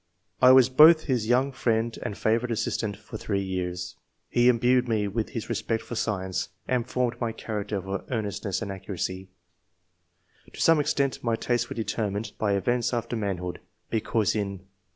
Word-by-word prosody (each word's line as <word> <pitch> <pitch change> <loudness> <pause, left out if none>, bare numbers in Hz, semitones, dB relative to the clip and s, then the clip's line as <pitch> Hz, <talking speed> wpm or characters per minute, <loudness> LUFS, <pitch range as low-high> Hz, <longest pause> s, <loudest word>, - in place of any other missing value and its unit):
I 125 0 +8
was 130 -1 +7
both 155 +5 +7
his 125 -6 0
young 130 +3 +3
friend 115 -2 0
and 105 - -4
favourite 115 +2 +1
assistant 110 -2 -2
for 105 - -9
three 100 -2 -1
years. 90 -1 -4 0.3
He 120 +1 +4
imbued 125 +1 +3
me 110 -3 +1
with 110 +2 -2
his 115 -5 -5
respect 115 -1 -2
for - - -8
science, 95 -5 -2 0.2
and 125 -1 0
formed 125 -1 -1
my 115 -1 0
character 105 -2 -4
for 95 +1 -4
earnestness 105 -3 -2
and 100 - -4
accuracy 95 -1 -5 1.2
To - - -11
some 165 -1 +5
extent, 140 -2 0
my 115 -1 +1
tastes 120 +1 -1
were - - -5
determined 105 -1 -2
by 105 -2 +1
events 120 +4 0
after 120 0 -2
manhood; 95 -5 -3 0.3
because 110 -1 +1
in 100 -3 -3
110 Hz, 165 wpm, -26 LUFS, 100-120 Hz, 1.2 s, I